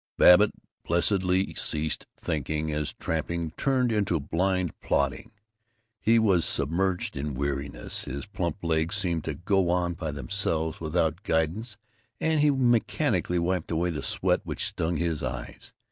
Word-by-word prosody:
Babbitt 95 +4 +7 0.3
blessedly 90 +2 +2
ceased 80 0 -1
thinking 75 +1 -2
as 75 -1 -2
tramping 80 0 -3
turned 130 +5 +1
into 100 -6 +1
blind 90 +4 0
plodding. 70 -1 -1 0.7
He 115 +1 +4
was 100 -7 +4
submerged 90 +5 +1
in 70 0 -3
weariness. 70 -2 -3
His 70 +2 -5
plump 85 -3 -4
legs 80 +3 0
seemed 85 -5 -1
to 80 - -3
go 95 +2 +1
on 90 0 +1
by 80 -2 -4
themselves, 80 +3 -2
without 80 +1 0
guidance, 100 +8 -1 0.4
and 160 -1 +1
he 150 0 +5
mechanically 120 -8 +1
wiped 90 0 -1
away 85 +1 0
the 75 - -4
sweat - - +1
which - - -2
stung 80 0 -1
his 85 -2 -1
eyes. 65 -3 -6
85 Hz, 140 wpm, -27 LUFS, 75-95 Hz, 0.7 s, Babbitt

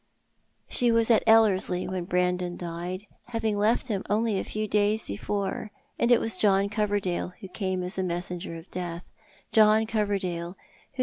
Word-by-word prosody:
She 240 -1 +3
was 230 0 +3
at 225 - +5
Ellerslie 200 -5 +4
when 185 -2 -3
Brandon 180 -1 0
died, 175 +3 -5 0.2
having 225 -3 -1
left 215 +5 +1
liim 205 -5 -1
only 215 -1 +1
a - - -2
few 215 0 -3
days 210 +1 +1
before, 195 - -3 0.3
and 235 - +2
it 240 - +6
was 225 -5 -1
John 200 -1 +3
Coverdale 205 -4 -1
who 195 - -7
came 185 -1 -3
as 180 +2 -3
the 190 - 0
messenger 175 -1 -4
of 165 +2 -11
death; 175 -1 -5 0.5
John 215 0 +5
Coverdale, 195 -5 -2 0.4
whoso - - -18
200 Hz, 165 wpm, -27 LUFS, 180-215 Hz, 0.5 s, it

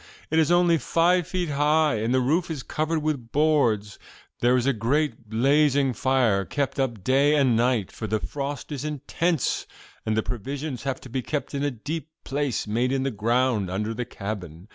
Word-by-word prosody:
It 160 - +3
is 160 +1 +3
only 175 -2 +4
five 175 +2 +2
feet 180 -3 -2
high, 150 -2 +2
and 110 +2 -1
the 130 0 +3
roof 160 +8 +1
is 150 -5 -4
covered 155 0 -1
with 140 -7 -2
boards. 130 -10 +2 0.4
There 125 +1 +4
is 125 - 0
a 140 - +3
great 125 +1 -1
blazing 135 +3 +3
fire 120 -5 +2
kept 140 +7 -2
up 120 -7 -1
day 140 +5 +3
and 135 -5 +3
night, 120 -4 +1
for 110 - -6
the 110 +1 0
frost 140 +3 -5
is 140 -2 -4
intense, 150 +1 -1 0.4
and 110 0 -1
the 110 - +2
provisions 135 +4 -4
have 135 -1 -2
to 130 - -11
be 130 +2 -2
kept 150 +4 -4
in 140 - -2
a 145 - +2
deep 145 +5 -5
place 140 -4 -1
made 120 +4 0
in 135 -1 0
the 135 - -1
ground 115 -1 +1
under 105 +4 -2
the 120 +2 -3
cabin. 95 -5 -7
135 Hz, 190 wpm, -25 LUFS, 115-150 Hz, 0.4 s, only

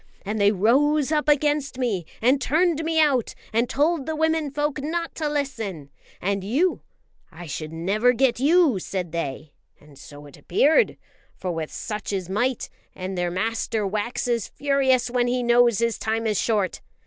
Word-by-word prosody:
And 210 +1 -2
they 200 0 +5
rose 275 - +2
up 300 -1 +1
against 290 -2 +1
me 210 -10 -1 0.2
and 265 +3 +4
turned 325 +3 +1
me 320 0 +1
out, 275 -7 +2 0.2
and 235 +2 +1
told 295 0 +1
the 315 - -2
women 320 -1 +1
folk 295 0 -2
not 335 +3 -3
to 310 -2 -2
listen; 225 - -4 0.3
and 195 0 -1
you 285 - +1 0.5
I 175 +1 -10
should 155 0 -5
never 200 +9 +2
get 250 0 +1
you, 300 - +4
said 180 -2 -4
they; 150 -2 -5 0.3
and 145 -2 -18
so 145 0 -12
it 145 - -14
appeared, 305 - +2 0.4
for 185 - -4
with 160 -2 -4
such 210 -1 -5
is 185 -3 -3
might, 245 +6 -1 0.3
and 185 +1 -5
their 175 -1 -1
master 220 +3 -1
waxes 230 +3 -1
furious 270 -3 +1
when 245 -1 +1
he 250 0 0
knows 240 -2 +4
his 230 -1 0
time 225 +1 -1
is 215 -3 +1
short. 205 -5 0
240 Hz, 170 wpm, -24 LUFS, 195-290 Hz, 0.5 s, they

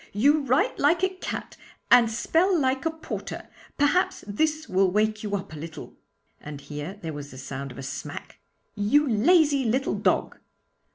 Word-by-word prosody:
You 285 +9 +4
write 270 -2 +1
like 330 +5 +3
a 375 - +4
cat 370 0 -6 0.3
and 235 -2 +7
spell 330 - +2
like 265 +1 0
a - - +2
porter. 320 0 -7 0.3
Perhaps 290 +6 +2
this 310 +10 -1
will 190 0 +2
wake 215 +2 +1
you 205 -1 -2
up 190 -5 -6
a - - -7
little' 160 0 -9 0.4
and 150 -1 -8
here 150 +7 -7
there 160 -1 -4
was 145 -1 -7
the 130 - -12
sound 135 +1 -6
of 125 - -12
a 135 - -7
smack 135 - -7 0.3
'you 280 +9 +2
lazy 285 - +4
little 255 +3 0
dog.' - - 0
225 Hz, 170 wpm, -26 LUFS, -, 0.4 s, and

